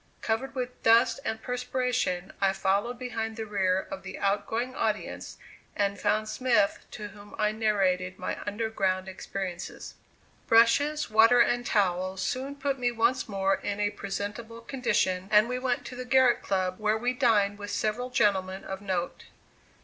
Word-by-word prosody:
Covered 265 Hz, +5 st, -2 dB
with 250 Hz, -1 st, -4 dB
dust 230 Hz, +4 st, +5 dB
and 220 Hz, -3 st, -3 dB
perspiration 250 Hz, -7 st, -1 dB
I 195 Hz, -1 st, +3 dB
followed 200 Hz, +5 st, 0 dB
behind 225 Hz, -3 st, -4 dB
the 220 Hz, -1 st, -4 dB
rear 190 Hz, -3 st, 0 dB
of 190 Hz, -, -5 dB
the 190 Hz, -, -8 dB
out 200 Hz, +1 st, 0 dB
going 240 Hz, +3 st, -2 dB
audience 215 Hz, -4 st, -3 dB, 0.4 s
and 200 Hz, -1 st, 0 dB
found 215 Hz, 0 st, +1 dB
Smith, 230 Hz, -4 st, +1 dB
to 210 Hz, -1 st, -7 dB
whom 205 Hz, 0 st, -13 dB
I 210 Hz, 0 st, +2 dB
narrated 190 Hz, -4 st, 0 dB
my -, -, -4 dB
under 215 Hz, +2 st, -1 dB
ground 190 Hz, -3 st, 0 dB
experiences. 190 Hz, -1 st, -6 dB, 0.5 s
Brushes, 265 Hz, +5 st, +4 dB
water 225 Hz, +3 st, +6 dB
and 240 Hz, +1 st, +3 dB
towels 185 Hz, -1 st, 0 dB
soon 270 Hz, +2 st, -3 dB
put 280 Hz, -1 st, -2 dB
me 245 Hz, -1 st, +1 dB
once 235 Hz, +1 st, +1 dB
more 195 Hz, -1 st, +1 dB
in 205 Hz, 0 st, -1 dB
presentable 205 Hz, +3 st, -5 dB
condition 190 Hz, -8 st, 0 dB
and 210 Hz, +2 st, +6 dB
we 250 Hz, +1 st, -2 dB
went 255 Hz, -1 st, -1 dB
to 250 Hz, -, -7 dB
the 255 Hz, -, -5 dB
Garrick 255 Hz, -1 st, +4 dB
Club 185 Hz, -1 st, -1 dB
where 215 Hz, 0 st, +1 dB
we 245 Hz, +3 st, 0 dB
dined 210 Hz, -6 st, +2 dB
with 205 Hz, 0 st, -6 dB
several 220 Hz, +5 st, -1 dB
gentlemen 195 Hz, -5 st, +1 dB
of 190 Hz, 0 st, -6 dB
note. 185 Hz, -3 st, -3 dB
215 Hz, 160 wpm, -28 LUFS, 195-245 Hz, 0.5 s, water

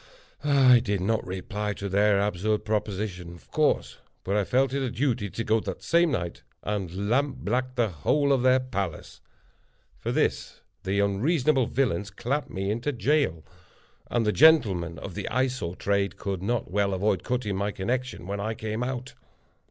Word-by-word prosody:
I 135 Hz, -4 st, +6 dB
did 105 Hz, -4 st, -1 dB
not 110 Hz, +4 st, 0 dB
reply 100 Hz, +3 st, -3 dB
to 100 Hz, -, -5 dB
their 100 Hz, +1 st, +3 dB
absurd 105 Hz, +1 st, 0 dB
proposition, 100 Hz, -4 st, -3 dB
of 85 Hz, -, -19 dB
course; -, -, +1 dB, 0.2 s
but 100 Hz, -, -1 dB
I 105 Hz, -, +2 dB
felt 130 Hz, +5 st, +1 dB
it 140 Hz, -, 0 dB
a 130 Hz, -, -1 dB
duty 120 Hz, -4 st, -1 dB
to 115 Hz, -, -4 dB
go 110 Hz, +1 st, +2 dB
that -, -, -6 dB
same 170 Hz, 0 st, +3 dB
night, 85 Hz, -, -3 dB, 0.2 s
and 100 Hz, -1 st, -3 dB
lamp 135 Hz, +4 st, +1 dB
black 125 Hz, +4 st, -1 dB
the 120 Hz, -3 st, +2 dB
whole 140 Hz, -, +1 dB
of 130 Hz, -, +2 dB
their 130 Hz, +1 st, +5 dB
palace. 100 Hz, -10 st, -5 dB, 0.8 s
For -, -, -3 dB
this -, -, -1 dB, 0.2 s
the 95 Hz, +2 st, -1 dB
unreasonable 130 Hz, -, +2 dB
villains 105 Hz, -7 st, 0 dB
clapped 125 Hz, +8 st, -2 dB
me 95 Hz, +1 st, -2 dB
into 120 Hz, +7 st, -1 dB
jail; 135 Hz, -, +1 dB, 0.7 s
and 120 Hz, -2 st, +1 dB
the 105 Hz, -, +3 dB
gentlemen 100 Hz, -, +4 dB
of 95 Hz, -, -7 dB
the -, -, -4 dB
Eye 130 Hz, +3 st, +2 dB
Sore 125 Hz, -10 st, -4 dB
trade 100 Hz, 0 st, 0 dB
could 95 Hz, -2 st, -3 dB
not 110 Hz, -1 st, -2 dB
well 100 Hz, 0 st, +1 dB
avoid 95 Hz, -1 st, 0 dB
cutting 120 Hz, -6 st, -1 dB
my 100 Hz, +2 st, -1 dB
connection 125 Hz, +2 st, -3 dB
when 100 Hz, +2 st, -4 dB
I 110 Hz, +2 st, -2 dB
came 110 Hz, +1 st, -4 dB
out. 130 Hz, +1 st, -4 dB
105 Hz, 175 wpm, -26 LUFS, 100-130 Hz, 0.8 s, I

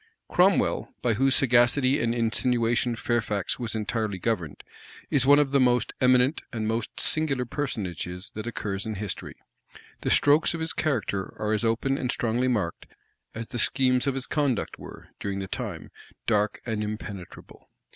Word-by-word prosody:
Cromwell, 185 Hz, +2 st, +2 dB
by 120 Hz, -2 st, +2 dB
whose 135 Hz, +4 st, +3 dB
sagacity 130 Hz, +2 st, +4 dB
and 115 Hz, 0 st, 0 dB
insinuation 120 Hz, +1 st, +1 dB
Fairfax 110 Hz, -4 st, -1 dB
was 115 Hz, -2 st, -2 dB
entirely 110 Hz, -2 st, -2 dB
governed, 90 Hz, -6 st, -2 dB, 0.5 s
is 135 Hz, -2 st, +3 dB
one 145 Hz, +1 st, +8 dB
of 145 Hz, -2 st, +2 dB
the 140 Hz, -, +3 dB
most 125 Hz, -1 st, +2 dB
eminent 130 Hz, +3 st, +4 dB
and 110 Hz, -2 st, -3 dB
most 115 Hz, 0 st, -3 dB
singular 140 Hz, -5 st, 0 dB
personages 95 Hz, -, -4 dB
that 110 Hz, +2 st, -6 dB
occurs 100 Hz, -3 st, -3 dB
in 110 Hz, -, -3 dB
history: 100 Hz, 0 st, -5 dB, 0.7 s
the -, -, -1 dB
strokes 150 Hz, +3 st, +4 dB
of -, -, -5 dB
his 160 Hz, 0 st, -1 dB
character 110 Hz, -9 st, -1 dB
are 105 Hz, 0 st, -1 dB
as 110 Hz, -, 0 dB
open 120 Hz, +4 st, +1 dB
and 125 Hz, -1 st, -1 dB
strongly 120 Hz, +2 st, 0 dB
marked, 105 Hz, -9 st, -2 dB, 0.5 s
as 115 Hz, 0 st, -6 dB
the 120 Hz, -, -4 dB
schemes 130 Hz, +3 st, +3 dB
of 135 Hz, -, +1 dB
his 135 Hz, -2 st, -2 dB
conduct 140 Hz, -7 st, -1 dB
were, -, -, -11 dB
during 100 Hz, -1 st, -3 dB
the 95 Hz, -1 st, -4 dB
time, -, -, -5 dB, 0.3 s
dark 105 Hz, -2 st, +1 dB
and 110 Hz, -3 st, -2 dB
impenetrable. 105 Hz, -4 st, -8 dB
120 Hz, 160 wpm, -26 LUFS, 105-130 Hz, 0.7 s, one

